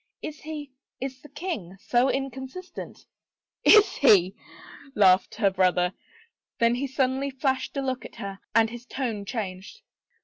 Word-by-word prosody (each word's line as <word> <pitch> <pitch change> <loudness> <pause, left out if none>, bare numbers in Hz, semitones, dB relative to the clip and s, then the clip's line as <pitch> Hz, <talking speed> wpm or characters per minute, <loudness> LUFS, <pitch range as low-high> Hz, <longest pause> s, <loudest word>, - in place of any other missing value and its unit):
" - - -64
Is 305 0 -6
he 300 -2 -7
— - - -67
is 265 0 -5
the 295 - -14
king 275 - -5
— - - -37
so 245 +5 +2
inconstant? 270 +7 -5 0.2
" - - -66
" - - -66
Is 420 - +3
he? 195 - +5 0.3
" - - -17 0.3
laughed 185 -3 +4
her 205 -3 +2
brother. 180 -1 +2 0.6
Then 230 0 +3
he 265 +3 -1
suddenly 265 +1 0
flashed 265 0 -1
a 275 - 0
look 260 -1 -2
at - - -11
her 195 0 -6 0.2
and 225 -1 +4
his 240 +1 -9
tone 230 -7 -3
changed. 200 - -6
255 Hz, 175 wpm, -26 LUFS, 200-275 Hz, 0.6 s, he